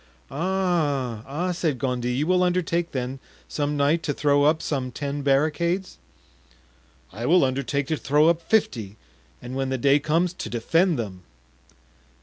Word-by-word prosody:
"Ah, 150 - -1
ah," 170 +7 -2
said 165 -6 -1
Gondy, 125 -2 -1
"you 135 +5 0
will 180 +2 +2
undertake, 175 -1 0
then, 130 0 -4 0.3
some 145 0 -2
night, 145 +4 +2
to 145 -4 -2
throw 145 -1 +3
up 155 +2 +3
some 130 -5 -3
ten 140 +3 -4
barricades?" 160 +7 0 1.1
"I 115 +5 -4
will 175 -3 +5
undertake 140 +2 -1
to 155 +2 -1
throw 150 +3 +3
up 170 0 +2
fifty, 115 - 0 0.5
and 125 +1 -6
when 135 0 -1
the 130 - -1
day 140 +3 +4
comes, 165 +4 +1
to 150 - -6
defend 165 - +1
them." 100 -6 -5
145 Hz, 150 wpm, -24 LUFS, 130-170 Hz, 1.1 s, will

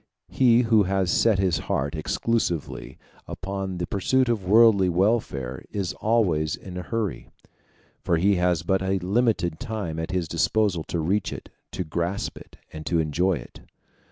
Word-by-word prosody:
He 120 -2 +4
who 110 -2 +4
has 95 -2 0
set 115 -4 +3
his 90 -4 +1
heart 70 +2 0
exclusively 85 +1 -2 0.3
upon 95 -1 -5
the 85 - -2
pursuit 125 +7 +1
of 110 -5 0
worldly 105 -4 +6
welfare 85 - 0
is 95 -3 -3
always 90 -10 +1
in 90 -2 -10
a 90 - -3
hurry, 110 +2 -3 0.7
for 85 - +1
he 95 +3 +3
has 90 -3 +1
but 95 +3 +1
a 95 0 0
limited 95 -3 0
time 105 -10 -4
at 80 - -4
his 90 -3 -1
disposal 90 +2 +1
to - - -3
reach 95 +6 0
it, - - -8 0.2
to 90 - -2
grasp 85 +4 -3
it, - - -16 0.2
and 80 0 -7
to 85 - +1
enjoy 80 +4 +1
it. 80 - -8
95 Hz, 160 wpm, -25 LUFS, 85-105 Hz, 0.7 s, worldly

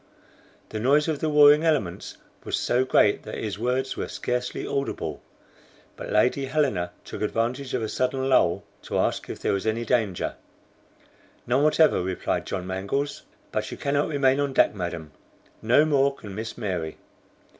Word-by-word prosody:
The 110 - -4
noise 140 +6 +3
of 155 -3 -1
the 155 - 0
warring 150 +1 +7
elements 145 - -1 0.3
was - - -2
so 125 +1 +1
great 105 -5 +3
that 110 - -7
his 105 -2 -4
words 125 +3 -1
were - - -3
scarcely 125 0 -3
audible, 135 - -3 0.7
but - - -8
Lady 125 +6 +2
Helena 130 -12 0 0.2
took - - -7
advantage 120 +5 -1
of 120 - -1
a - - -1
sudden 130 +3 -1
lull 110 -10 +3 0.2
to - - -3
ask - - 0
if - - -5
there - - -1
was 100 +2 -2
any 115 +2 0
danger. 110 -6 0 1.1
"None 125 +3 +2
whatever," 155 - +4
replied 90 0 -2
John 90 - -3
Mangles; 100 +10 -2 0.3
"but - - -2
you - - -7
cannot 140 +1 0
remain 140 -2 +2
on 140 -1 0
deck, - - +4
madam, 85 -5 -5 0.5
no 125 +7 +4
more 140 -2 +2
can 100 -7 -10
Miss 110 +3 -6
Mary." 90 -8 -3
125 Hz, 165 wpm, -25 LUFS, 100-140 Hz, 1.1 s, warring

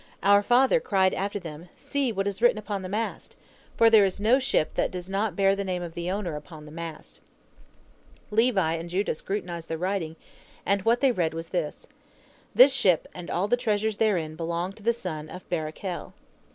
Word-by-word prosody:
Our 200 +1 +6
father 255 - +4
cried 190 - +2
after 200 +2 -2
them, 165 -2 -9
'See 280 -4 -1
what 195 -2 -2
is 200 +1 -3
written 240 -2 +5
upon 205 -2 -4
the 185 - -6
mast,' 220 +3 -4 0.4
for 230 - +6
there 220 -2 +7
is 190 -1 0
no 230 +6 +4
ship 260 - 0
that - - 0
does 180 -1 -6
not 200 -1 -1
bear 195 0 +3
the 200 - -2
name 180 -2 -3
of 170 -1 -7
the 170 +1 -4
owner 185 -4 -2
upon 150 0 -10
the 150 - -11
mast. 165 0 -8 1.1
Levi 210 -7 +3
and 165 +1 -5
Judah 195 +4 0
scrutinized 175 -1 -5
the 160 - -3
writing, 180 -2 -2 0.5
and 200 +1 +2
what 235 +2 +3
they 270 -2 +5
read 170 -7 -1
was 165 0 -6
this, 170 -5 -3 0.7
'This 265 +2 +8
ship 200 -11 +3
and 180 -1 -8
all 185 +4 0
the 245 - +3
treasures 215 -2 0
therein 175 -8 +1
belong 170 +2 -2
unto 205 - -16
the 230 +3 +3
son 160 -9 -5
of 180 - -10
Barachel.' 170 +2 -4
190 Hz, 195 wpm, -26 LUFS, 170-215 Hz, 1.1 s, This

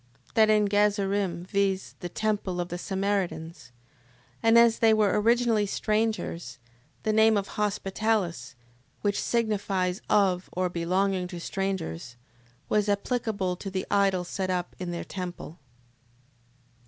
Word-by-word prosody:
That 220 -1 +5
in 210 -1 +4
Gazarim... 200 -3 +1
Viz., 195 -1 0
the 175 - -5
temple 205 -2 -1
of 175 0 -2
the 175 - -4
Samaritans. 190 - -2 0.7
And 225 0 +5
as 235 -1 +5
they 225 -1 +5
were 210 -1 +2
originally 230 -2 +3
strangers, 210 - -1 0.5
the 215 - +1
name 220 0 +5
of 200 0 -2
Hospitalis 200 - -1 0.5
(which 205 -1 +1
signifies 200 -5 0
of 190 -3 +2
or 180 0 0
belonging 185 +2 0
to 180 -1 -7
strangers) 170 - -4 0.5
was 210 -1 +1
applicable 200 -3 -1
to 195 - -6
the 190 -1 -3
idol 195 -3 +2
set 185 +1 -3
up 180 -1 -2
in 180 -1 -4
their 170 0 -4
temple. 180 -3 -7
195 Hz, 130 wpm, -27 LUFS, 180-215 Hz, 0.7 s, That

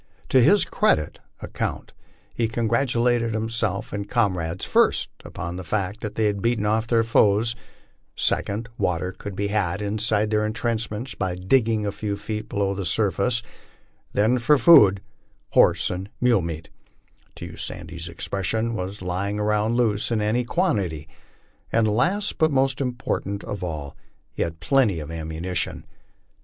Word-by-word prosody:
To 130 - +5
his 200 - +5
credit 75 - +1 0.2
account - - -4 0.4
he 115 - 0
congratulated 115 0 +1
himself 110 -4 -2
and 100 0 -4
comrades, 90 -7 0
first - - +2
upon 85 +2 -6
the 95 - -6
fact 100 +4 -2
that 105 - -5
they 110 - +1
had 100 -2 0
beaten 115 -2 +1
off 110 +2 +1
their 115 -1 +3
foes; 115 0 +3 0.6
second, 110 +4 -1
water 90 +1 0
could 100 +1 -8
be 100 +1 -1
had 100 -4 0
inside 105 +1 0
their 105 0 +2
intrenchments 115 +2 -2
by 90 -1 -2
digging 110 +3 +2
a 100 - -1
few 100 0 -3
feet 105 +1 -5
below 100 -1 0
the 100 0 -4
surface; 100 +6 +1 0.7
then 115 +5 +2
for 145 +5 +4
food 105 - +7 0.3
'* - - -41
horse - - +4
and 95 +2 -5
mule 120 -5 +3
meat," 80 -1 -6 0.7
to - - -7
use - - -8
Sandy's 85 0 -5
expression, 105 +6 -2
"was 95 -1 -5
lying 100 +3 -2
around 105 +2 +1
loose 110 -4 +1
in 115 -2 0
any 110 +4 +1
quantity; 100 - -1 0.3
" - - -37
and 115 -1 +3
last, 175 - +1
but 160 - +4
most 135 0 +1
important 120 -6 -3
of 105 -3 -5
all, 75 -5 -5 0.4
he - - -5
had 85 0 -2
plenty 105 -1 +2
of 75 +1 -7
ammunition. 80 +2 -3
105 Hz, 155 wpm, -24 LUFS, 95-115 Hz, 0.7 s, food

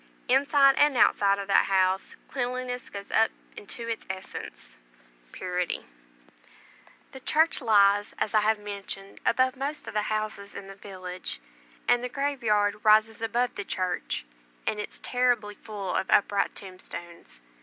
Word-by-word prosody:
Inside 275 +1 +5
and 290 -3 +4
outside 200 -3 +4
of 200 - -4
that 200 - +5
house 190 0 +1
cleanliness 250 -1 -3
goes 200 0 -8
up 225 - +4 0.3
into 230 +3 -7
its 230 -1 -3
essence, 190 0 -7 0.6
purity. 180 -1 -3 1.3
The - - -10
little - - -20
church 320 0 +3
lies, 205 -3 +4
as 215 - -1
I 215 0 +4
mentioned, 200 -1 -8
above 255 +2 +3
most 280 +3 -3
of - - -6
the 210 - +1
houses 215 -2 -3
in 200 - -7
the 195 - -9
village; 185 - -6 0.5
and 245 0 +4
the 250 - -2
graveyard 220 -7 0
rises 220 +1 +5
above 240 +2 0
the 205 - -4
church, 185 - -2 0.4
and 210 - -1
is 210 - -6
terribly 245 -4 +1
full 205 -3 -6
of - - -1
upright 200 0 +3
tombstones. 175 - -9
210 Hz, 145 wpm, -27 LUFS, 195-245 Hz, 1.3 s, Inside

